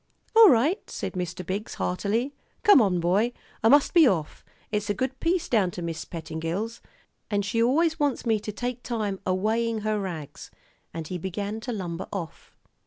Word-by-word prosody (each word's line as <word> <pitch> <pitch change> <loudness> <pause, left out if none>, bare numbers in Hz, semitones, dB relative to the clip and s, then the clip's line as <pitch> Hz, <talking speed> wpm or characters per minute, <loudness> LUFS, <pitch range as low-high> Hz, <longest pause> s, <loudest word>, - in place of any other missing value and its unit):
"All 450 -2 +10
right," 290 - +2
said - - -4
Mr. 180 -1 -4
Biggs, 195 +5 -4
heartily. 220 +9 -1 0.3
"Come 410 - +8
on, 190 -5 +2
boy; 195 +8 +2 0.3
I 225 - +6
must 285 +2 +5
be 335 -5 +7
off. 165 -9 -1 0.3
It's 210 0 -1
a 205 - +1
good 260 +5 -2
piece 345 +1 0
down 210 -6 +2
to 175 - -4
Mis' 165 -1 -4
Pettingill's. 165 +7 -4 0.5
And 205 -1 0
she 230 +3 0
always 320 +7 +2
wants 290 -4 0
me 220 -2 +2
to 210 - -5
take 245 +3 -4
time 215 -6 -2
a 185 - +2
weighin' 220 +3 0
her 215 0 0
rags." 160 -7 -6 0.4
And 165 -2 -6
he 180 +1 -4
began 200 +4 -4
to 235 +3 -5
lumber 185 -4 -4
off. 175 -6 -7
210 Hz, 180 wpm, -26 LUFS, 185-245 Hz, 0.5 s, All